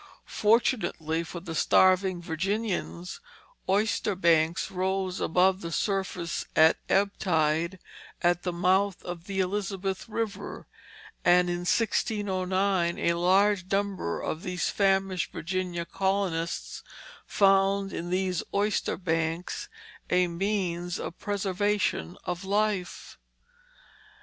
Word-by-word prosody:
Fortunately 210 -8 +1
for 170 +1 -7
the 170 -2 -6
starving 185 +1 +3
Virginians, 185 +1 -3 0.5
oyster 205 0 +1
banks 165 -2 +2
rose 190 0 -1
above 185 +3 +3
the 170 - -5
surface 185 -3 -2
at 160 +1 +5
ebb 200 +1 +3
tide 165 0 +1 0.5
at 175 0 +3
the 180 - -2
mouth 185 +2 +1
of 175 -1 -6
the 195 -1 -3
Elizabeth 195 +1 -3
River, 225 -1 -4 0.6
and 180 0 +4
in 175 - -1
1609 190 -3 0
a 170 - +1
large 185 +2 +2
number 195 - -1
of 155 - -3
these 180 -2 -2
famished 195 -2 +1
Virginia 175 0 -3
colonists 190 -3 -2 0.5
found 195 0 +3
in 175 - -4
these 185 -1 0
oyster 205 +1 0
banks 165 -1 -2 0.4
a 180 0 +3
means 175 -1 -2
of 170 - -6
preservation 205 - -1
of 180 +1 -4
life. 200 -2 -1
185 Hz, 105 wpm, -28 LUFS, 175-200 Hz, 0.6 s, at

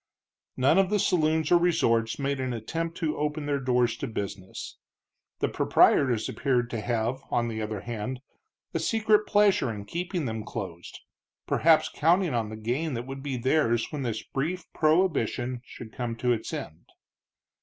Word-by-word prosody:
None 140 +8 +4
of 190 -1 +3
the 210 - +2
saloons 160 -4 +2
or 175 - +7
resorts 115 -10 +2
made 140 -1 -1
an 130 -1 -2
attempt 165 +9 -4
to 160 -3 -1
open 150 0 -2
their 145 -1 0
doors 125 -2 +2
to - - -4
business. 100 -3 -6 0.6
The - - +3
proprietors 120 -5 +3
appeared 120 -3 0
to 115 - -3
have, 120 +3 -1
on 120 0 0
the 110 -1 -4
other 105 -2 -4
hand, 120 +3 -4 0.5
a - - 0
secret 215 -1 +2
pleasure 205 - +3
in 100 -2 -7
keeping 175 - -3
them 110 -2 -3
closed, 90 -7 -7 0.4
perhaps 155 -1 +4
counting 170 +1 +2
on 115 -3 -1
the 110 - -7
gain 125 +7 -2
that 120 +1 -4
would 135 +1 -7
be 135 -2 -3
theirs 120 -2 +1
when 150 -3 -4
this 115 -4 -3
brief 170 +6 -3
prohibition 155 -7 +1
should 115 -3 -11
come 120 -2 -3
to 125 +1 0
its 110 - -4
end. 80 +1 -7
130 Hz, 165 wpm, -27 LUFS, 115-160 Hz, 0.6 s, or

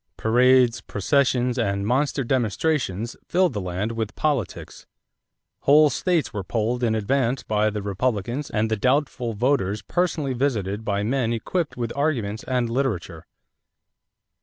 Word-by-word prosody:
Parades, 125 +1 +4
processions, 125 +3 +1
and 100 -3 0
monster 135 +4 +1
demonstrations 120 - -1
filled 180 -4 +2
the 105 - -3
land 90 +4 -3
with 115 -2 -4
politics. 140 - -3 0.7
Whole 150 +1 +5
states 170 +4 0
were 100 -2 -3
polled 115 +5 -1
in 110 -2 +2
advance 125 +4 0
by 105 0 +1
the 105 -1 -4
Republicans 120 +6 -2
and 110 0 -1
the - - +3
doubtful 130 -1 0
voters 105 -3 0
personally 170 -6 -1
visited 110 -6 -1
by 100 -2 -1
men 120 +1 0
equipped 150 +8 -2
with 120 -2 -3
arguments 120 -8 -1
and 125 -2 0
literature. 110 -10 -2
120 Hz, 135 wpm, -24 LUFS, 105-135 Hz, 0.7 s, Whole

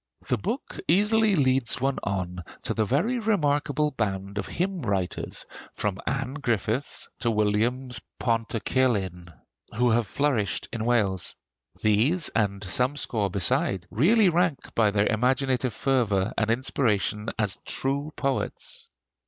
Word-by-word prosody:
The - - +1
book - - -4
easily 210 +2 +4
leads 130 -5 +2
one 135 +1 0
on 90 -2 -3 0.2
to - - 0
the 110 - +1
very 170 - +1
remarkable 150 -8 +1
band 100 -4 -2
of 100 - -4
hymn 185 0 -2
writers, 100 -7 -2 0.3
from 100 -2 -2
Anne 135 0 -1
Griffiths 120 -2 -2
to 120 - +1
Williams 115 +4 0 0.2
Pantycelyn, 115 -6 0 0.4
who 120 +1 +3
have 115 -1 +2
flourished 125 -2 0
in 115 -1 -2
Welsh. 105 -7 +1 0.4
These, 120 - +2
and 100 -2 0
some 125 +9 +1
score 105 -8 0
beside, 95 0 +1
really 195 - +4
rank 170 -5 0
by 110 -2 +3
their 100 0 +2
imaginative 125 +1 +1
fervor 110 -6 +1
and 110 -1 0
inspiration 115 -3 0
as 105 -3 -1
true 140 +3 -1
poets. 460 - -3
120 Hz, 130 wpm, -26 LUFS, 105-140 Hz, 0.4 s, easily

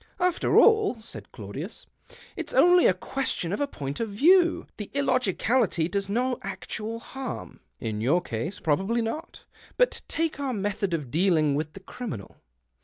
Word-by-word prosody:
" - - -34
After 350 - +1
all," 435 - +5
said 220 - -10
Claudius, - - -7 0.3
" - - -20
it's - - -4
only 355 0 +7
a - - +5
question 200 -5 -2
of 205 - -2
a 285 - +1
point 140 - -5
of 230 - -1
view^. 340 - +4
The 210 - -6
illogicality 250 - +2
does 200 +2 -2
no 250 +4 0
actual 195 +4 -5
harm." 260 +3 -7
"' - - -49
In 105 -1 -3
your 145 +10 +3
case 165 - -4
possibly 195 +10 +1
not. 305 +10 -5 0.3
But - - +2
take 325 -3 -1
our 275 -2 -1
method 200 -3 -1
of 145 -7 -5
dealing 160 -3 +3
with 155 +2 -2
the 195 - -10
criminal. 190 - -7
210 Hz, 170 wpm, -27 LUFS, 170-265 Hz, 0.3 s, only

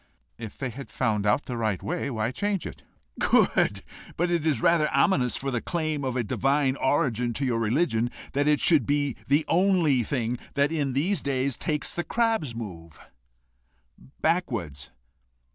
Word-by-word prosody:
"If 110 -3 -8
they 135 -3 -3
had 125 0 -9
found 105 -2 0
out 105 +8 +2
the 125 - -4
right 110 -4 -1
way, 175 -4 -2
why 115 -2 -1
change 200 +6 -2
it?" - - -8 0.4
"Good! - - +2 0.3
But 175 +2 +1
it 165 -2 0
is 145 -7 +2
rather 155 +3 +3
ominous 135 -3 +2
for 135 0 -3
the 120 -2 -1
claim 155 -4 -2
of 130 -2 -2
a 125 - 0
divine 135 +5 +1
origin 125 -5 +1
to 140 - -2
your 120 -3 0
religion 115 0 +1 0.2
that 145 +1 +1
it 150 -1 +3
should 155 -9 +4
be 145 -2 0
the 145 +3 +2
only 175 -6 +3
one 120 - -1
thing 120 -2 -2 0.2
that 140 +2 +2
in 145 -5 -1
these 165 +5 0
days 135 -1 -1
takes 150 +3 -2
the 175 - -2
crab's 225 - 0
move 85 -8 -8 1.2
backwards. 120 - -1
135 Hz, 170 wpm, -26 LUFS, 120-155 Hz, 1.2 s, should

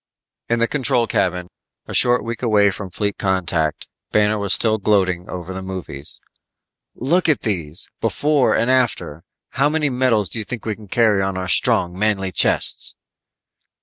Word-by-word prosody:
In 115 - +2
the 115 0 +1
control 125 -4 +1
cabin, 90 -4 -1 0.4
a - - -7
short 120 -2 +5
week 115 +1 -5
away 105 -4 +3
from 95 +1 -7
fleet 100 +2 -3
contact, 85 -5 -1 0.2
Banner 105 0 +2
was 100 -2 -2
still 110 +2 +2
gloating 95 -4 0
over 90 +1 -6
the 95 - -6
movies. 90 -7 -8 0.8
"Look 165 +7 +1
at 150 - +2
these. 85 -7 -4
Before 145 -2 +1
and 120 - +1
After. 120 - 0 0.3
How 140 +4 +1
many 150 -2 0
medals 125 -6 +1
you 110 - -1
think 110 +3 -7
we 110 -1 -2
can 105 -1 -14
carry 110 -2 +2
on 95 -1 -2
our 95 0 -4
strong, 90 0 +3
manly 95 -1 0
chests?" - - 0
105 Hz, 160 wpm, -20 LUFS, 95-120 Hz, 0.8 s, short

